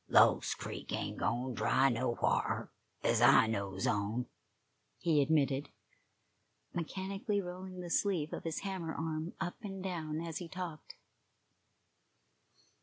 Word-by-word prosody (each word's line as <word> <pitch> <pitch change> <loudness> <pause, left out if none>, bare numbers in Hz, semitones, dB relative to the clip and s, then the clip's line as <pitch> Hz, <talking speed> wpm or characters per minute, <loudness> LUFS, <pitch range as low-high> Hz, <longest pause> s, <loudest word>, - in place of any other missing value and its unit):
"Lost - - +5
Creek - - -6
ain't - - -2
gone 125 +2 0
dry 130 +3 +3
nowhar, 120 0 0 0.3
ez - - +3
I - - +8
knows 100 -4 -2
on," 105 +4 0 0.7
he 160 -4 +3
admitted, 140 -2 +2 1.0
mechanically 195 +4 -2
rolling 185 0 -6
the 175 -1 -6
sleeve 175 -7 +1
of - - -4
his 165 -1 -2
hammer 185 -5 -3
arm 160 +1 -3
up 180 -2 -3
and 195 -2 -6
down 160 -5 -2
as 165 -1 -4
he 175 - -6
talked. 175 -4 -6
160 Hz, 120 wpm, -34 LUFS, 135-185 Hz, 1.0 s, I